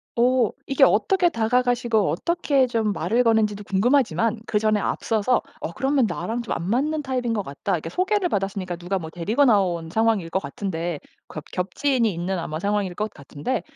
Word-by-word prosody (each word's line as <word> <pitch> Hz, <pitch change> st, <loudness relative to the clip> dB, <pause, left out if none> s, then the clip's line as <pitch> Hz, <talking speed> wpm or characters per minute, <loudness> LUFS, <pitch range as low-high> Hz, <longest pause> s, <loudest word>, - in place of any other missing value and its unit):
어 245 Hz, -1 st, +3 dB, 0.2 s
이게 275 Hz, -, +3 dB
어떻게 380 Hz, -3 st, +4 dB
다가가시고 240 Hz, -, +1 dB
어떻게 280 Hz, -, +1 dB
좀 225 Hz, -3 st, 0 dB
말을 235 Hz, +4 st, +1 dB
거는 225 Hz, -2 st, +4 dB
지도 205 Hz, 0 st, -8 dB
궁금하지만 225 Hz, -, +1 dB
그전에 215 Hz, 0 st, +2 dB
앞서서 225 Hz, +4 st, 0 dB, 0.2 s
어 -, -, -4 dB
그러면 270 Hz, +2 st, +1 dB
'나랑 215 Hz, +6 st, -3 dB
좀 235 Hz, -, -13 dB
안 170 Hz, -, -4 dB
맞는 295 Hz, +7 st, 0 dB
타입인 250 Hz, -3 st, -1 dB
것 210 Hz, -2 st, -1 dB
같다.' 145 Hz, +6 st, -4 dB
이렇게 165 Hz, -1 st, -2 dB
소개를 375 Hz, -, +1 dB
받았으니까 195 Hz, -, -2 dB
누가 175 Hz, +3 st, -3 dB
뭐 160 Hz, -2 st, -7 dB
데리고 210 Hz, -, +1 dB
나온 180 Hz, -8 st, +2 dB
상황일 220 Hz, -4 st, +1 dB
것 190 Hz, -, +1 dB
같은데 170 Hz, -6 st, -4 dB, 0.3 s
그렇 155 Hz, -, -7 dB
겹지인이 230 Hz, +6 st, 0 dB
있는 180 Hz, +2 st, -3 dB
아마 155 Hz, -1 st, -4 dB
상황일 200 Hz, -1 st, -1 dB
것 215 Hz, +2 st, -3 dB
같은데 145 Hz, -, -4 dB
215 Hz, 395 characters per minute, -23 LUFS, 180-250 Hz, 0.3 s, 어떻게